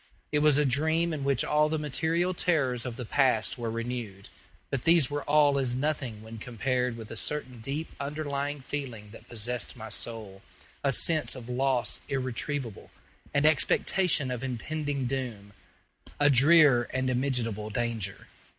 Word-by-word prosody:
It 150 - +2
was 150 -1 +4
a 150 - +3
dream 160 +5 +1
in 145 -3 -4
which 135 -2 +1
all 150 0 +2
the 160 - 0
material 160 +4 0
terrors 135 -9 0
of 120 - -5
the 125 - -6
past 125 -2 +1
were 115 -1 -3
renewed; 115 -4 -5 0.4
but 135 -3 -2
these 165 -5 +4
were 145 0 -2
all 145 -1 +4
as 125 -2 0
nothing 130 -6 -2
when 110 0 -9
compared 125 +1 -2
with 110 -1 -9
a - - -5
certain 130 0 -3
deep 140 +8 -4
underlying 145 0 -3
feeling 125 -7 -6
that 115 - -14
possessed 120 +1 0
my 110 -2 -8
soul 110 -5 -3 0.4
a 140 - +2
sense 155 +3 +3
of 125 -2 -9
loss 125 -3 0
irretrievable, 130 - -3 0.4
an 145 +1 +2
expectation 155 -1 +2
of 125 -1 -4
impending 140 +2 -3
doom, 120 -6 -4 0.7
a 145 0 +5
drear 140 -2 +6
and 130 0 -1
immitigable 120 -5 -1
despair. 110 -3 -3
130 Hz, 155 wpm, -28 LUFS, 115-145 Hz, 0.7 s, drear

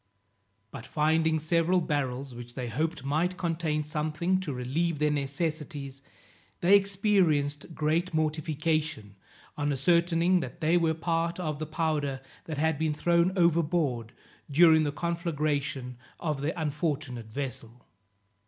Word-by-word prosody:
But 115 - -9
finding 160 +1 +2
several 165 +3 +2
barrels, 135 -5 -2
which 120 0 -10
they 125 -2 -4
hoped 150 +4 -2
might 165 +6 0
contain 160 -3 -1
something 155 +5 -1
to 180 -6 -4
relieve 145 +6 -1
their 150 +1 +2
necessities, 140 -1 -3 0.6
they 185 +4 +6
experienced 185 -7 +2
great 160 +4 0
mortification, 155 - -1 0.4
on 145 0 -1
ascertaining 170 +5 +3
that 170 - -6
they 165 +1 +2
were 165 -2 +2
part 165 +1 -1
of 155 -4 -3
the 155 - -4
powder 155 -4 -1 0.3
that 155 -3 -5
had 160 0 +1
been 155 -2 0
thrown 170 +3 +3
overboard 160 -8 +1 0.4
during 160 +1 +6
the 145 - 0
conflagration 145 -5 -2 0.2
of 150 -5 -2
their 150 +3 -1
unfortunate 145 -6 -2
vessel. 125 -2 -6
155 Hz, 125 wpm, -28 LUFS, 145-170 Hz, 0.6 s, they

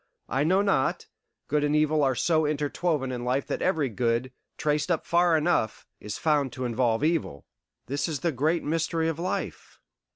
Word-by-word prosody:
I 135 +2 0
know 185 +6 +3
not; 175 -10 +1 0.4
good 150 0 +1
and 150 0 +1
evil 155 0 +2
are 135 -2 +2
so 160 +2 +2
interwoven 150 -1 -1
in 120 -1 -4
life 130 +3 0
that - - -3
every 160 -6 +1
good, 120 +2 -1 0.3
traced 150 +1 0
up 165 -3 0
far 170 -1 +3
enough, 155 -8 0
is 105 - -6
found 145 -4 +1
to 130 - -4
involve 120 0 +1
evil. 155 - -1 0.4
This 140 +7 -2
is 155 -4 -3
the 170 - +1
great 155 +5 0
mystery 165 +1 0
of 165 0 -4
life. 180 +2 -4
150 Hz, 175 wpm, -27 LUFS, 130-165 Hz, 0.4 s, know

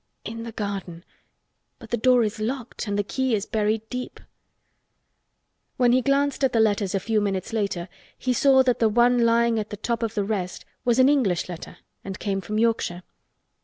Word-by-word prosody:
"In 230 +1 -6
the 230 0 -6
garden! 195 -5 -5 0.7
But 225 - -14
the - - +2
door 245 +1 +4
is 215 0 -3
locked 240 +1 -4
and 200 0 -1
the 205 - +1
key 260 +3 0
is 205 0 -2
buried 215 0 -1
deep." 250 0 -5 1.6
When 245 -2 +4
he 255 +1 +4
glanced 280 +1 +1
at 265 - +2
the 230 - +3
letters 205 -2 +2
a - - +1
few 215 +2 0
minutes 195 +1 -2
later 200 -5 -1 0.3
he 255 - 0
saw 265 +1 +5
that 250 -2 +1
the 225 - +4
one 240 +2 +4
lying 230 0 +3
at 210 - -4
the 210 - -6
top 235 +3 -2
of 225 -1 -2
the 205 - +1
rest 195 -3 -3 0.2
was 240 -2 +2
an 260 0 +6
English 245 -12 +2
letter 175 -2 -8 0.3
and 195 -1 -6
came 195 -2 -2
from 215 +3 -4
Yorkshire. 220 -6 0
225 Hz, 195 wpm, -24 LUFS, 200-245 Hz, 1.6 s, an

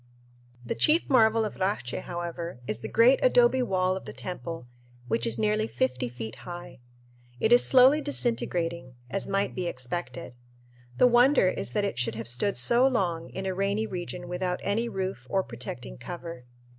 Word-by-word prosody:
The - - -1
chief 320 +3 +2
marvel 225 -3 +4
of 210 - -6
Racche, 185 -10 -2
however, 170 -4 -5
is 110 - -3
the - - -6
great 240 +4 +5
adobe - - +4
wall 185 -5 +1
of 190 - -7
the 105 - -8
temple, 165 +1 -6 0.4
which 115 0 0
is 115 +1 -1
nearly 105 0 +1
fifty 125 +2 -1
feet 115 -2 -7
high. 175 -7 -9 0.6
It 220 - +3
is 245 - +6
slowly 265 +4 +6
disintegrating, 170 - -1 0.2
as 195 - -2
might 195 0 0
be 180 -2 -3
expected. 125 -2 -5 0.6
The - - +6
wonder 245 -3 +5
is - - -4
that 210 -1 +1
it 120 -12 -3
should 120 -2 0
have 115 +1 -6
stood 125 +12 0
so 245 +2 +4
long 175 -10 -1
in 190 - -6
a 190 - -1
rainy 200 +3 0
region 175 -2 -6
without 180 0 -2
any 225 +4 0
roof 190 - -4
or 190 -1 +1
protecting 120 - -8
cover. 170 -7 -8
180 Hz, 170 wpm, -27 LUFS, -, 0.6 s, is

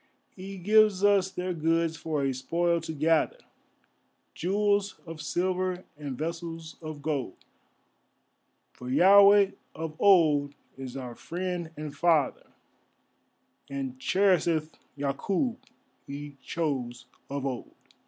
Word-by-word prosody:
He 195 +1 -8
gives 210 +1 +4
us 200 -2 +4
their 180 -1 -3
goods 165 0 +1
for 155 -3 -2
a 135 -1 +1
spoil 170 +6 0
to 160 - -5
gather, 160 +1 +1 1.0
Jewels 200 +2 +1
of 165 -2 -8
silver, 185 +3 -1
and 145 -4 -6
vessels 165 0 -5
of 155 -2 -7
gold; 140 -10 -2 1.4
For 125 - -9
Yahveh 200 +6 +7 0.2
of 160 -1 -5
old 150 -7 +4 0.2
is 135 -1 -7
our 125 -2 -6
Friend 175 +4 -4
and 150 -1 -6
Father, 160 -2 +2 1.2
And 135 -2 -5
cherisheth 170 -3 +2 0.3
Yakûb 185 - -1 0.5
He 145 +1 -7
chose 130 -6 -3 0.2
of 140 0 -3
old. 130 -3 -5
165 Hz, 110 wpm, -28 LUFS, 140-185 Hz, 1.4 s, Yahveh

